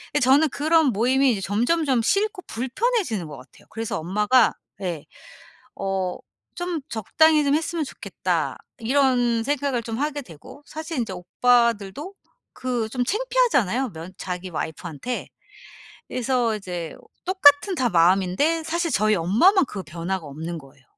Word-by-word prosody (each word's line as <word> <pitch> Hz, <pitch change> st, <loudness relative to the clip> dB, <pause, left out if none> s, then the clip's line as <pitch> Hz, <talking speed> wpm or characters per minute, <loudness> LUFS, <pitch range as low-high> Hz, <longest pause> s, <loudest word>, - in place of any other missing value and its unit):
예 -, -, +4 dB
저는 275 Hz, +5 st, +5 dB
그런 315 Hz, +3 st, +3 dB
모임이 255 Hz, +5 st, +3 dB
이제 200 Hz, -, -4 dB
점점점 250 Hz, -, +1 dB
싫고 400 Hz, -, 0 dB
불편해지는 260 Hz, -, -1 dB
것 150 Hz, -, -8 dB
같아요. 130 Hz, -1 st, -16 dB
그래서 225 Hz, 0 st, -3 dB
엄마가 210 Hz, +8 st, +3 dB, 0.3 s
예 170 Hz, -5 st, -3 dB, 0.7 s
어 190 Hz, -2 st, -2 dB, 0.4 s
'좀 350 Hz, -2 st, -3 dB
적당히 305 Hz, +7 st, +3 dB
좀 285 Hz, +1 st, +2 dB
했으면 320 Hz, +1 st, -2 dB
좋겠다.' -, -, -3 dB, 0.2 s
이런 245 Hz, -1 st, +2 dB
생각을 275 Hz, -1 st, -1 dB
좀 225 Hz, 0 st, -5 dB
하게 290 Hz, 0 st, -2 dB
되고 175 Hz, -, -14 dB
사실 315 Hz, +1 st, -6 dB
인제 230 Hz, -5 st, -2 dB
오빠들도 235 Hz, -, +1 dB, 0.4 s
그 245 Hz, -3 st, -2 dB
좀 250 Hz, +3 st, -2 dB
창피하잖아요 400 Hz, -, +1 dB
면 165 Hz, +1 st, -9 dB
자기 180 Hz, 0 st, -5 dB
와이프한테. 165 Hz, -, -5 dB, 0.8 s
그래서 245 Hz, -2 st, 0 dB
이제 180 Hz, -5 st, -5 dB, 0.3 s
똑같은 370 Hz, -1 st, +5 dB
다 260 Hz, -7 st, +1 dB
마음인데 190 Hz, -, +3 dB
사실 335 Hz, 0 st, -1 dB
저희 215 Hz, +1 st, +3 dB
엄마만 240 Hz, -, +4 dB
그 200 Hz, -6 st, -6 dB
변화가 170 Hz, +2 st, -4 dB
없는 160 Hz, +4 st, -6 dB
거예요. 135 Hz, -2 st, -17 dB
245 Hz, 305 characters per minute, -23 LUFS, 190-300 Hz, 0.8 s, 저는